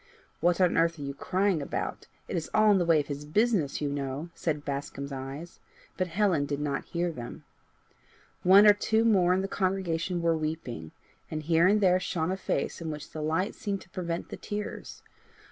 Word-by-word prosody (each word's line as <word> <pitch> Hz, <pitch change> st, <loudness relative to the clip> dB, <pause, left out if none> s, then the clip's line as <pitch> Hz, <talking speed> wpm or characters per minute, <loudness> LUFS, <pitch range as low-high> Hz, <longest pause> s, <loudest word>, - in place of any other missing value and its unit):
"What 175 Hz, +1 st, +2 dB
on 180 Hz, -2 st, +3 dB
earth 165 Hz, 0 st, +3 dB
are 145 Hz, -, -6 dB
you 140 Hz, 0 st, -4 dB
crying 185 Hz, +3 st, 0 dB
about? 140 Hz, -, -4 dB, 0.2 s
It -, -, -4 dB
is 165 Hz, -2 st, -2 dB
all 215 Hz, 0 st, +6 dB
in 195 Hz, -, +4 dB
the 175 Hz, -, +1 dB
way 165 Hz, -2 st, +5 dB
of 145 Hz, -, -1 dB
his 145 Hz, 0 st, -5 dB
business, 180 Hz, -, +1 dB
you 145 Hz, -, 0 dB
know," 140 Hz, +3 st, -4 dB
said 150 Hz, -4 st, -2 dB
Bascombe's 140 Hz, 0 st, -4 dB
eyes, 135 Hz, +5 st, -7 dB, 0.4 s
but 185 Hz, -, -1 dB
Helen 180 Hz, -5 st, +1 dB
did 145 Hz, 0 st, -2 dB
not 145 Hz, -2 st, -2 dB
hear 175 Hz, 0 st, -1 dB
them. 120 Hz, -6 st, -8 dB, 1.0 s
One 195 Hz, +3 st, +7 dB
or 210 Hz, -, +9 dB
two 220 Hz, +2 st, +1 dB
more 190 Hz, -6 st, +4 dB
in 185 Hz, +1 st, +2 dB
the -, -, -1 dB
congregation 185 Hz, -3 st, -1 dB
were 165 Hz, -1 st, +3 dB
weeping, 155 Hz, -, -4 dB, 0.4 s
and 155 Hz, -1 st, -4 dB
here 165 Hz, +2 st, +4 dB
and 210 Hz, +2 st, +4 dB
there 185 Hz, -1 st, +4 dB
shone 165 Hz, -2 st, -1 dB
a -, -, 0 dB
face 190 Hz, -, -2 dB
in 165 Hz, -, -4 dB
which 150 Hz, -1 st, -7 dB
the 155 Hz, -, -5 dB
light 160 Hz, +6 st, 0 dB
seemed 200 Hz, -5 st, -3 dB
to -, -, -16 dB
prevent 170 Hz, -2 st, -4 dB
the -, -, -6 dB
tears. 210 Hz, 0 st, -6 dB
170 Hz, 200 wpm, -28 LUFS, 150-190 Hz, 1.0 s, or